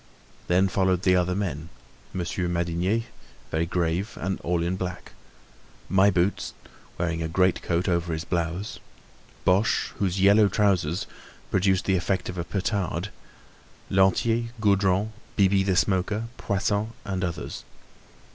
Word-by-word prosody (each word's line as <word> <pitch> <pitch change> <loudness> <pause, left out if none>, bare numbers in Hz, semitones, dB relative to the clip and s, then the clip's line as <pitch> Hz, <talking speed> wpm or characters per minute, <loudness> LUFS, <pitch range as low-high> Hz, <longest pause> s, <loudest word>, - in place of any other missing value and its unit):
Then 90 +2 +4
followed 95 -1 +1
the 90 -1 +4
other 90 0 +1
men—Monsieur 90 0 -5
Madinier, 85 +5 0 0.5
very 80 +1 0
grave 90 +3 -1
and 95 +2 -2
all 85 -1 0
in 90 +2 0
black; 95 -1 -5 0.8
My 95 +1 +5
Boots, 90 +1 0 0.4
wearing 85 -1 -1
a 80 - -1
great 90 +3 +2
coat 85 +2 0
over 85 -2 0
his 80 +1 -3
blouse; 85 +4 -2 0.7
Boche, 95 +4 +2
whose 95 -1 0
yellow 100 +2 +6
trousers 95 -4 +1 0.5
produced 95 0 +2
the 95 -1 +2
effect 95 +1 -1
of 90 -1 -5
a - - -1
petard; 95 -1 -2 0.8
Lantier, 95 +5 +3
Gaudron, 100 0 +2 0.2
Bibi 95 -1 +4
the 95 -1 +1
Smoker, 100 +5 +1
Poisson 105 +2 -1
and 95 -2 -2
others. 85 -2 -4
95 Hz, 130 wpm, -26 LUFS, 85-100 Hz, 0.8 s, yellow